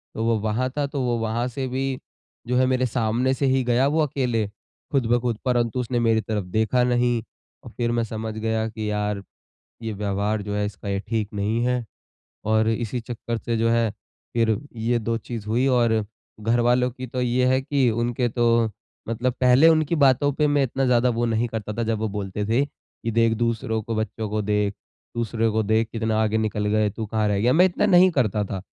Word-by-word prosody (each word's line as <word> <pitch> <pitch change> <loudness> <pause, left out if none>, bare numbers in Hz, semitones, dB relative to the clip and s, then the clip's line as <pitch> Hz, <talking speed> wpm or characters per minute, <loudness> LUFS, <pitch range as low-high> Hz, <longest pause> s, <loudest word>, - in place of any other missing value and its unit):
तो 110 - -2
वो 115 -1 +2
वहाँ 110 +4 -1
था 145 - +1
तो 140 -1 -3
वो 120 -2 0
वहाँ 115 +2 -1
से 130 +2 -4
भी 130 +1 -2 0.5
जो 125 +1 +1
है 130 - +4
मेरे 130 0 +1
सामने 120 +2 +1
से 140 - -1
ही 130 -1 +2
गया 125 +2 +2
वो 155 +3 +2
अकेले 125 -6 -1
ख़ुद 130 +5 -5
ब 120 - +4
ख़ुद 120 -3 -1
परंतु 120 -1 +1
उसने 125 0 -1
मेरी 115 -1 +2
तरफ 110 -2 -2
देखा 110 +3 +2
नहीं 120 -1 +2 0.4
और - - -9
फ़िर 120 -1 0
मैं 120 0 +1
समझ 110 0 -4
गया 110 0 -1
कि 110 -1 -4
यार 105 -1 -1 0.6
ये 110 -1 -3
व्यवहार 100 +1 -1
जो 105 0 -4
है 105 0 0
इसका 105 0 -7
ये 100 0 0
ठीक 110 -2 -1
नहीं 105 +3 0
है। 125 -1 0 0.6
और 110 0 +2
इसी 115 +1 -2
चक्कर 115 0 -5
से 115 0 -2
जो 115 +1 +2
है 115 -1 +2
फ़िर 110 +1 -2 0.2
ये 115 +1 0
2 115 +1 -1
चीज़ 115 -1 -7
हुई 120 +4 +1
और 115 -4 +3 0.4
घरवालों 120 +3 +2
की 130 +1 -7
तो 125 +1 -3
ये 125 +1 +2
है 130 +1 +3
कि 135 -2 +1
उनके 120 +2 0
तो 115 -1 +2 0.4
मतलब 120 +2 0
पहले 125 +5 +6
उनकी 155 0 +2
बातों 145 -1 +4
पे 150 +2 +2
मैं 145 -1 +3
इतना 135 +1 -1
ज़्यादा 125 0 +3
वो 120 0 0
नहीं 115 +1 0
करता 110 -2 -5
था 115 - -2
जब 110 -1 -1
वो 110 - -1
बोलते 100 0 -3
थे 120 +6 +2
कि 115 -4 -8
देख 115 0 +3
दूसरों 115 -1 -1
को 115 +1 -4
बच्चों 110 0 -3
को 105 +1 -1
देख, 105 -1 0 0.4
दूसरे 115 -1 0
को 110 0 0
देख 110 +2 +1
कितना 110 -1 0
आगे 110 0 +1
निकल 105 -1 -1
गए 105 0 +2
तू 110 +2 -5
कहाँ 110 0 0
रह 100 -1 +1
गया? 120 +5 +3
मैं 180 +3 +6
इतना 185 - +1
नहीं 185 -2 +6
करता 110 - +1
था। 95 -1 -5
115 Hz, 215 wpm, -24 LUFS, 110-125 Hz, 0.6 s, पहले